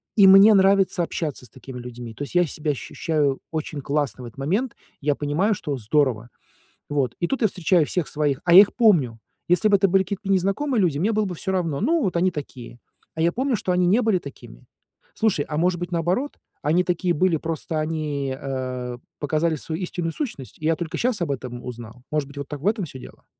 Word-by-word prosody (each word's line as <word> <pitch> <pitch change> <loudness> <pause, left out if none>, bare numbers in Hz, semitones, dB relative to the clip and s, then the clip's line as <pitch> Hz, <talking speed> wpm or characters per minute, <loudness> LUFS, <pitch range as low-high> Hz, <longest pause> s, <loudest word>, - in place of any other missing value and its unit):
И 200 - +7
мне 195 +3 +9
нравится 195 -2 +3
общаться 150 -6 -4
с 120 - -11
такими 130 0 -10
людьми. 120 -1 -8
То 145 - -6
есть 145 - -7
я 175 0 +5
себя 150 0 -2
ощущаю 145 0 -1
очень 155 -2 -4
классно 140 -4 -2
в 120 - -7
этот 115 - -14
момент, 205 - -1 0.3
я 145 0 +1
понимаю, 160 +9 0
что 150 -6 -4
здорово. 120 0 0 0.6
Вот. 135 -5 -1
И 175 - +1
тут 265 +7 -2
я 220 - +5
встречаю 180 -3 +2
всех 180 -4 -2
своих, 145 -3 -1
а 170 - +4
я 185 - +12
их 205 - -2
помню. 160 - +3 0.3
Если 180 +4 +4
бы 205 - +5
это 195 0 +2
были 190 +1 +4
какие-то 200 +1 -5
незнакомые 200 +7 +1
люди, 165 -6 +1
мне 205 +8 +1
было 215 -1 +1
бы 180 - -4
всё 190 +3 -3
равно, 165 -6 -1
ну, 320 +5 +2
вот 185 -3 -1
они 180 +2 +3
такие. 130 -6 -8 0.4
А 160 - -5
я 170 +1 +3
помню, 255 +1 0
что 185 - -2
они 180 0 +2
не 205 +7 +4
были 215 -5 +2
такими. 135 - -12 0.5
Слушай, 210 -10 +1
а 150 0 -2
может 175 +1 +1
быть, 175 0 -5
наоборот? 175 - 0 0.3
Они 160 +5 +3
такие 180 0 0
были, 175 +1 +2
просто 160 0 -3
они, 150 -4 -2
э, 130 -2 -4 0.2
показали 155 +2 0
свою 160 +5 -5
истинную 175 -2 -3
сущность, 215 - -6
и 155 - -11
я 165 0 +3
только 165 -1 -4
сейчас 245 -4 0
об 160 - -2
этом 125 -2 -5
узнал? 120 0 -9
Может 150 -2 -1
быть, 140 0 -10
вот 140 - -6
так 145 -2 -6
в 160 - -6
этом 210 -4 +1
всё 130 - -10
дело? - - -13
165 Hz, 220 wpm, -23 LUFS, 140-190 Hz, 0.6 s, я